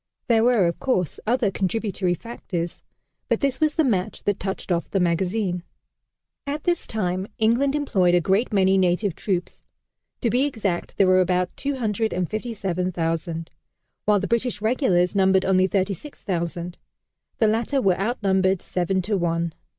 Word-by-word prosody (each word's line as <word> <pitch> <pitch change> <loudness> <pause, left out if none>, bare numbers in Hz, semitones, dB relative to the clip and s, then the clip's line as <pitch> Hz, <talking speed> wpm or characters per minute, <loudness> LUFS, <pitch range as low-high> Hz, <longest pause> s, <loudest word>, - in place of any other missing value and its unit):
There 225 -2 +3
were, 235 -6 +4
of 170 - -1
course, 185 - -1
other 235 -3 +2
contributory 190 -2 -1
factors, 175 -5 -5 0.5
but - - +2
this 275 -2 0
was 305 -1 +2
the 320 - +3
match 210 -6 -1
that 205 -1 0
touched 190 0 -4
off 170 -1 0
the 195 - 0
magazine. 180 +2 0 0.9
At 290 +1 -3
this 345 -1 0
time 185 -3 -2
England 240 +6 +2
employed 190 -12 +2
a - - +5
great 195 +8 +1
many 190 -1 +3
native 185 +1 +1
troops. 180 -4 -3 0.6
To 235 - +1
be 255 +3 +3
exact, 205 -10 -3
there 195 - +5
were 185 0 +5
about 180 0 0
257,000; 185 - -2 0.5
while 210 -1 +4
the 200 - -2
British 235 -1 0
regulars 210 -5 +2
numbered 190 -1 +3
only 185 0 +3
36,000. 180 - -3 0.6
The 220 - +3
latter 230 +6 +1
were 190 -7 +2
outnumbered 195 -4 +1
seven 185 +1 -1
to 210 +3 0
one. 170 -2 -1
195 Hz, 145 wpm, -24 LUFS, 180-225 Hz, 0.9 s, a